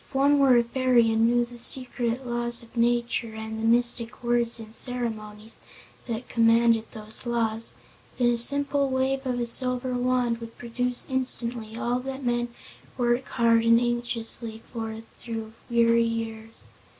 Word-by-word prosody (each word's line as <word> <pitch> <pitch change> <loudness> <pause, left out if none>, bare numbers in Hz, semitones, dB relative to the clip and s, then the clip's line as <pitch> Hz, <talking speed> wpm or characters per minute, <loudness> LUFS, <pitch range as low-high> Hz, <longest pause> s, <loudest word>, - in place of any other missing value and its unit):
If - - -17
one 280 +2 +4
were 265 -3 +5
a 235 - +4
fairy 240 -1 +2
and 225 +1 +3
knew 240 0 +2
the 240 0 -12
secret 245 0 -1
laws 240 -1 -1
of 230 - -18
nature 235 -1 0
and 220 0 -6
the 225 - 0
mystic 235 0 +1
words 235 -1 +1
and 220 -1 -11
ceremonies 220 -3 -4 0.5
that 235 +1 -4
commanded 230 -1 +3
those 215 +3 -6
laws, 230 -1 -1 0.4
then 245 -1 +3
a 240 - +1
simple 280 +3 +4
wave 265 +1 -1
of 250 -1 -1
a 240 - 0
silver 250 +1 +1
wand 245 -1 0
would 230 -1 -10
produce 245 +1 -1
instantly 240 -4 -1
all 245 +1 -1
that 265 +1 -6
men 240 0 0 0.5
work 240 +1 +1
hard 230 -1 +3
and 230 0 +5
anxiously 235 -2 -3
for 225 -1 -5 0.2
through 225 -2 -6 0.2
weary 235 0 +3
years. 225 -1 -6
235 Hz, 155 wpm, -26 LUFS, 230-250 Hz, 0.5 s, were